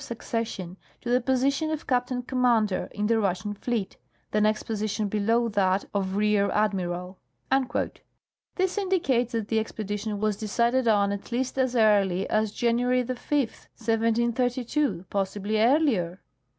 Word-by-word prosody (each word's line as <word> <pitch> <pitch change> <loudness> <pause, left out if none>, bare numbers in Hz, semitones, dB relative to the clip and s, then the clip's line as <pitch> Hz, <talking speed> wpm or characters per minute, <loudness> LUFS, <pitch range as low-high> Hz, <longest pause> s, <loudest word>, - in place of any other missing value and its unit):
succession, 220 -6 -4 0.2
to 240 - -4
the 250 +1 +3
position 275 +5 +1
of 310 -1 -3
captain 250 0 0
commander 240 -6 +1
in 210 - -2
the 225 +1 +2
Russian 195 0 -1
fleet, 215 -1 -3 0.4
tlie 210 - +3
next 215 0 +2
position 215 -1 -2
below 225 +3 +1
tliat 195 -3 +1
of 195 -2 -1
rear 210 -1 +2
admival." 185 -3 -1 1.4
This 375 +2 0
indicates 280 - +1
that 225 -2 -2
the 225 - +2
expedition 210 -1 -4
was 210 -1 0
decided 235 +4 +1
on 200 -2 +3
at 200 +3 -6
least 255 +2 -1
as 255 -1 +1
early 200 -4 +3
as 215 -1 +1
January 245 +2 +1
5, 250 - -4
1732; 235 - -1
possibly 200 +2 -1
earlier. 225 - +2
220 Hz, 135 wpm, -26 LUFS, 205-245 Hz, 1.4 s, the